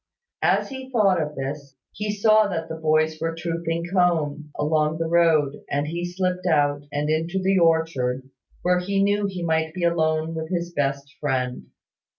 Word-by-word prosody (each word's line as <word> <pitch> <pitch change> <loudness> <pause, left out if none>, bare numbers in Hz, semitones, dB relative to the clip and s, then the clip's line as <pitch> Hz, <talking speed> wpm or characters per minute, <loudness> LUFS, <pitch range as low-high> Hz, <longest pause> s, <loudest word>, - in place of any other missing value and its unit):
As - - +2
he 265 -1 -7
thought 200 -8 +3
of 150 -1 -4
this, 140 0 -5 0.2
he 210 0 -3
saw 215 +1 +4
that 165 -4 -3
the - - -4
boys 155 0 +1
were 165 0 -1
trooping 170 0 -2
home, 155 -5 +1
along 155 +1 +1
the 165 - -1
road, 160 -4 +2
and 145 +1 0
he 175 +3 -4
slipped 180 0 -1
out, 145 -3 +2
and 145 +1 -1
into 160 +4 0
the 190 0 +2
orchard, 160 -7 +1 0.4
where 180 0 +3
he 195 +2 0
knew 205 0 +2
he 185 -3 -5
might 160 -1 0
be 180 - -3
alone 160 -1 +1
with 160 -1 -4
his 175 -1 -2
best 140 -2 -2
Friend. 130 -3 -2
165 Hz, 170 wpm, -24 LUFS, 150-180 Hz, 0.4 s, saw